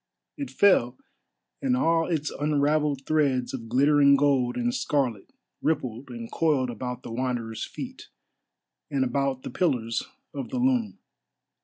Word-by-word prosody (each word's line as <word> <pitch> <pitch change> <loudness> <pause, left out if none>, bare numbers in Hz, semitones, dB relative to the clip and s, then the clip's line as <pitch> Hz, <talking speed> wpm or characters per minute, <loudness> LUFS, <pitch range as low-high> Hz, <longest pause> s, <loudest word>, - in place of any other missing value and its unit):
It 285 -2 -5
fell, 130 -12 +3 0.6
and 255 -2 +1
all 165 -8 +2
its 155 -4 -1
unravelled 145 -1 +1
threads 140 -5 +1
of 115 -4 -6
glittering 140 +3 +5
gold 135 -3 +2
and 240 0 0
scarlet 130 - -1 0.3
rippled 130 -5 -2
and 115 -2 -7
coiled 145 -6 +1
about 125 +2 -5
the - - -7
Wanderer's 120 -2 -2
feet, - - -8 0.8
and 135 -2 +1
about 135 +1 -1
the - - -6
pillars 125 -10 0 0.3
of 140 -2 -5
the 260 - -3
loom. 250 -3 +1
140 Hz, 135 wpm, -26 LUFS, 125-155 Hz, 0.8 s, glittering